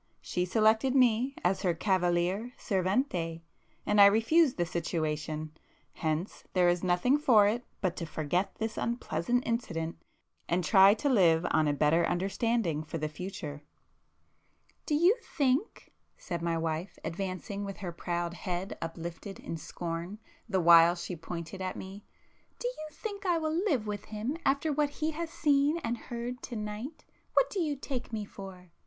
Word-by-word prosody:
—she 180 - -2
selected 220 +6 +3
me 250 +1 +3
as 185 +2 +1
her 175 -3 +1
cavaliere 185 +5 +1
servente, 185 - -1 0.4
and 210 0 +4
I 200 - +11
refused 245 +8 +4
the 175 - +1
situation,—hence 155 +1 -4
there 180 -1 +4
is 175 +1 +2
nothing 185 +11 +3
for 230 -8 +6
it 235 +4 -1 0.2
but 185 -3 0
to 170 - -4
forget 160 +5 -1
this 220 0 -3
unpleasant 235 0 -1
incident, 165 -9 -2 0.5
and 175 +1 +1
try 195 +3 +7
to 285 - -2
live 175 -10 +4
on 155 -1 +3
a 145 - +2
better 150 +4 +3
understanding 190 -2 0
for 160 - -5
the 155 -1 -2
future——" 150 -3 -6 1.3
"Do 300 - +2
you 350 +8 +5 0.2
think"—said 265 - -2
my 170 -1 0
wife, 165 +3 -3
advancing 190 +3 -4
with 200 -1 -6
her 180 -3 -5
proud 170 0 -3
head 180 +1 -4
uplifted 170 +4 -6
in - - -5
scorn, 170 +4 -5 0.3
the 190 -3 +2
while 170 0 +7
she 180 +1 -5
pointed 170 +3 -7
at 185 0 -3
me—"Do 200 - -10
you 400 -11 -5
think 400 +6 -6
I 350 -2 +3
will 315 -1 -1
live 320 - +1
with 205 -1 -4
him 220 +7 -3
after 285 +3 +2
what 295 0 +1
he 305 +2 -2
has 330 +1 -4
seen 295 -1 +2
and 230 +1 -1
heard 240 +1 -4
to 240 - -6
night? 215 +7 -6 0.3
What - - +4
do 400 - -2
you 305 -4 0
take 265 -3 -5
me 215 -2 -3
for?" 190 -3 -11
195 Hz, 155 wpm, -30 LUFS, 170-245 Hz, 1.3 s, I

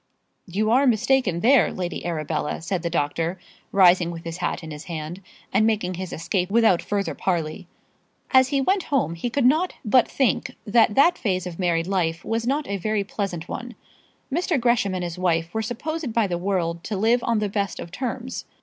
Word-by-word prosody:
"You 210 +5 0
are 265 +3 +4
mistaken 235 -6 +2
there, 255 0 +5
Lady 175 -3 -4
Arabella," 155 -1 -2
said 180 0 -2
the 170 - -2
doctor, 165 +3 -1 0.3
rising 180 -3 +5
with 170 -1 -7
his 165 0 -5
hat 180 -1 -2
in 160 - -7
his 150 +1 -8
hand 165 +2 -6 0.3
and 215 - +4
making 210 -5 0
his 185 0 -5
escape 180 +2 -1
without 220 -4 +4
further 200 -1 -2
parley. 165 -2 -2 0.6
As 260 -1 +6
he 275 0 +1
went 380 +6 +1
home 265 - 0
he 170 +8 -3
could 260 +1 0
not 315 +8 +3
but 240 +3 +4
think 265 -4 0
that 220 -1 +3
that 345 +5 +4
phase 185 -5 -1
of 180 -1 -7
married 170 -2 +1
life 170 -3 -1
was 225 +1 -1
not 285 +2 0
a 200 - -2
very 215 +2 -1
pleasant 195 -4 -4
one. 245 0 -6 0.6
Mr. 335 -2 +1
Gresham 235 -5 +2
and 180 - -2
his 175 0 -5
wife 170 -2 0
were 220 - 0
supposed 280 +6 -4
by 230 -2 +3
the 180 -3 -2
world 170 -3 -1
to 210 - -3
live 230 +4 +2
on 230 -1 +1
the 210 -1 0
best 200 -2 -2
of 170 - -7
terms. 250 +3 -4
200 Hz, 195 wpm, -24 LUFS, 175-240 Hz, 0.6 s, As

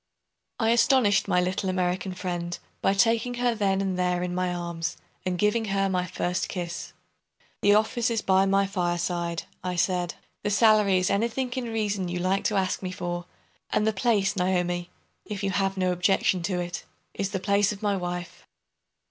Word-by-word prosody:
I 225 -1 +3
astonished 235 -4 +4
my 180 -2 +3
little 185 +2 0
American 185 0 -1
friend 175 -2 -3 0.2
by 195 - +2
taking 230 +4 +2
her 245 0 +1
then 195 -3 +1
and 190 -2 -1
there 180 -1 +1
in 180 0 -2
my 180 0 0
arms, 170 -1 -3 0.3
and 180 -1 0
giving 210 +4 +2
her 195 -1 +1
my 180 -1 0
first 180 0 -2
kiss. 175 -2 -5 0.7
"The 205 0 +5
office 220 +2 +2
is 225 -2 -1
by 190 0 +4
my 195 +1 +3
fireside," 175 -2 -1 0.2
I 180 0 -2
said; 180 0 0 0.3
"the - - -1
salary 210 -2 +5
is 185 +1 +1
anything 235 +5 0
in 255 0 -3
reason 210 -4 -1
you 175 0 -3
like 185 +2 0
to 210 - +1
ask 190 -1 0
me 185 - -3
for; 175 -2 -4 0.4
and 210 - +1
the 220 - +2
place, 205 -2 +1
Naomi, 180 -1 0 0.3
if 205 -1 -6
you 195 - +1
have 195 0 0
no 185 -1 +2
objection 180 0 +2
to 180 -2 -1
it, 175 0 -4 0.3
is 195 -1 -2
the 195 - -2
place 200 +1 +2
of 210 +1 -8
my 205 -1 +2
wife." 175 -1 -5
190 Hz, 180 wpm, -26 LUFS, 180-205 Hz, 0.7 s, The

